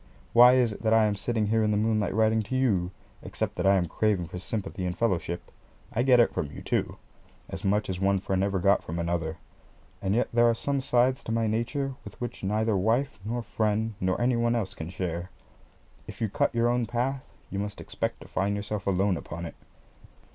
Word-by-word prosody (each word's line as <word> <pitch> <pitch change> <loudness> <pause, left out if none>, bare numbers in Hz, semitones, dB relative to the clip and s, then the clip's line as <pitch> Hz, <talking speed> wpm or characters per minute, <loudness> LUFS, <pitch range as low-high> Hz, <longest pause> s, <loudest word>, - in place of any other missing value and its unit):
Why 125 +1 +9
is 125 -4 +3
it - - -10
that 110 0 +3
I 110 -1 +5
am 105 - +1
sitting 110 +2 -1
here 110 +1 +2
in 105 - +2
the 105 - +2
moonlight 110 -2 +1
writing 110 0 +3
to 110 +5 -4
you, 105 -9 +2 0.3
except - - -3
that - - 0
I 100 - +6
am 90 -2 +2
craving 100 +1 0
for 90 - -6
sympathy 95 -1 -4
and 90 0 -2
fellowship? 90 -6 -1 0.4
I 120 - +1
get 125 -1 +5
it 120 - +4
from 75 - -2
you, - - -9
too - - -1 0.5
as - - -6
much 105 +2 +1
as 90 -1 -3
one 100 0 +2
friend 95 0 -1
ever 100 -1 0
got 100 +2 +3
from 80 - -5
another 85 -2 -2 0.6
and 95 +1 0
yet 120 - +2
there 120 0 +5
are 115 - +2
some 140 +3 -1
sides 125 0 +2
to - - -3
my 115 0 +1
nature 125 +6 -1
with - - -11
which 120 -3 -5
neither 105 +2 +1
wife 115 +7 +1
nor 120 +3 -3
friend 110 +1 0
nor 95 0 0
any 120 +1 +2
one 115 0 +1
else 100 -4 -2
can 80 -3 -7
share. 90 -1 -4 0.8
If - - -9
you 110 -2 0
cut 100 - 0
your 115 0 +3
own 120 -1 +1
path, 130 +3 -1 0.3
you 100 - -2
must 105 0 -4
expect - - -4
to - - -11
find 100 +2 -1
yourself 100 -1 -4
alone 95 -1 +2
upon 85 +1 -6
it. - - -7
105 Hz, 220 wpm, -27 LUFS, 95-120 Hz, 0.8 s, Why